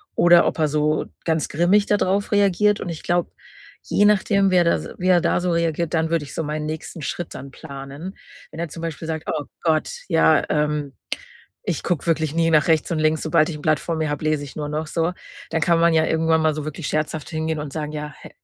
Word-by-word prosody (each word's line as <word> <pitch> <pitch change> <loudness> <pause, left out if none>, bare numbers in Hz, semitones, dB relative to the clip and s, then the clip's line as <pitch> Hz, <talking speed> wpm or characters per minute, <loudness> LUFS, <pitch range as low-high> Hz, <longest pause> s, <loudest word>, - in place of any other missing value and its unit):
oder 175 0 +6
ob - - -1
er 155 - +3
so 150 +1 +1 0.2
ganz 160 -2 +1
grimmig 180 +6 +3
dadrauf 200 -1 +1
reagiert. 205 0 +3
Und - - -4
ich 165 -2 -6
glaube, 175 0 0 0.5
je 205 - +2
nachdem, 200 -1 +3
wer 180 -1 +5
da 170 - +3
s - - -5
wie 185 - -2
er 175 -2 +5
da - - +1
so 180 0 -1
reagiert, 170 -1 0
dann 160 -1 +1
würde 165 -3 0
ich - - -11
so - - -2
meinen 150 0 -3
nächsten 155 +1 -6
Schritt 175 +3 -4
dann 135 +1 -8
planen. 140 +5 -9 0.3
Wenn 160 - -9
er 170 - -3
zum 165 +3 -8
Beispiel 165 -1 -5
sagt: 160 -1 -4
„Oh 150 -2 -2 0.2
Gott, 160 -2 +1 0.2
ja, 160 -1 +4
ähm, 150 -2 0 0.7
ich - - -1
gucke 175 -5 -1
wirklich 160 -2 0
nie 165 0 +2
nach 155 0 +4
rechts 160 -2 +2
und 160 - 0
links, 155 0 +1
sobald 160 0 +3
ich 160 - -4
'n 150 - -11
Blatt 155 -2 +2
vor 165 -1 -3
mir 155 -1 -1
habe, 145 +1 -3
lese 155 -2 0
ich 140 - -11
nur 150 -1 -3
noch“, 155 +1 -3
so. 165 +3 -1 0.4
Dann 165 -1 -1
kann 170 -1 +3
man 170 0 +4
ja 160 0 +4
irgendwann 160 0 +2
mal 155 -1 +2
so 155 -1 -4
wirklich 155 0 -5
scherzhaft 155 0 -2
hingehen 160 -1 -2
und 150 -2 -5
sagen, 150 -1 -4
ja: 150 -1 -5
„He - - -11
160 Hz, 240 wpm, -22 LUFS, 150-170 Hz, 0.7 s, oder